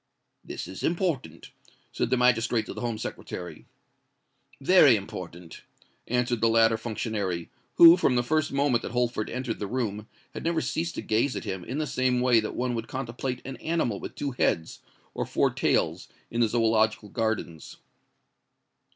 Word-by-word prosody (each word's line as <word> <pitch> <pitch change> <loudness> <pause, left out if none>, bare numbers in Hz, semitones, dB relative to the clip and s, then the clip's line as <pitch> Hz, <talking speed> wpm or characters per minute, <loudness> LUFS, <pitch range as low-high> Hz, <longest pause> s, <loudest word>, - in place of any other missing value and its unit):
"This - - -6
is 95 - -8
important," 170 -5 -2 0.4
said - - -1
the 130 - +2
magistrate 120 -2 +2
to - - -7
the - - -7
Home 120 -2 -2
Secretary. 90 -6 -7 0.9
"Very 145 -3 +6
important," 90 -4 -8 0.5
answered 125 -1 0
the 115 - +4
latter 115 0 +4
functionary, 105 -6 -3 0.2
who, 170 0 +10
from 140 -8 +2
the 120 - +2
first 155 +4 0
moment 140 -4 +2
that - - -6
Holford 120 -3 -1
entered 125 -1 -4
the 105 - -3
room, 110 -3 -3 0.3
had - - -6
never 165 0 +1
ceased 165 +2 -2
to - - -5
gaze 115 +5 +1
at - - -4
him 95 -2 -4
in 130 +9 -5
the 155 - 0
same 130 -2 +1
way 125 -2 +4
that 110 - -4
one 125 0 -1
would 115 -1 -4
contemplate 125 0 -4
an 135 0 -6
animal 160 -11 -1
with - - -8
two 140 - -3
heads, 85 -9 -1 0.3
or - - -2
four - - +1
tails, - - 0 0.2
in 115 - 0
the 115 - +4
Zoological 110 -2 +1
Gardens. 110 -9 -3
120 Hz, 170 wpm, -27 LUFS, 110-130 Hz, 0.9 s, who